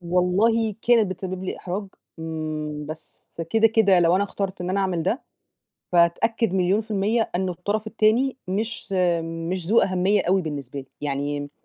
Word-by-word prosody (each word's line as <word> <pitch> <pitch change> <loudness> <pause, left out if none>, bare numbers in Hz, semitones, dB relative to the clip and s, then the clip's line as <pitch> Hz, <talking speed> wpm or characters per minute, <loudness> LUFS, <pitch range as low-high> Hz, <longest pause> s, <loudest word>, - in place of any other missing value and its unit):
والله 195 +6 +2
كانت 230 -3 +4
بتسبب 185 0 -5
لي - - -3
إحراج، 195 +3 -4 0.3
إمم، 155 -2 -4
بس 155 +2 -11
كده، 225 0 +5
كده 210 -5 +4
لو 170 +1 +4
أنا 200 - +2
اخترت 195 -2 -4
إن 180 +1 -2
أنا 195 +1 +1
أعمل 185 -4 0
ده، 205 - -1 0.7
فاتأكد 175 +5 +2
مليون 190 +2 +2
في 220 0 -12
المِيَّة 215 +3 +1
إنه 185 0 -1
الطرف 205 +5 -3
التاني 225 +5 +2
مش 215 +2 -3 0.3
مش 165 +2 -4
ذو 220 +6 +5
أهمية 190 +2 +2
أوي، 190 +1 +2
بالنسبة 145 -4 -5
لي. 135 - -13
يعني 145 0 -3
185 Hz, 160 wpm, -24 LUFS, 165-215 Hz, 0.7 s, كده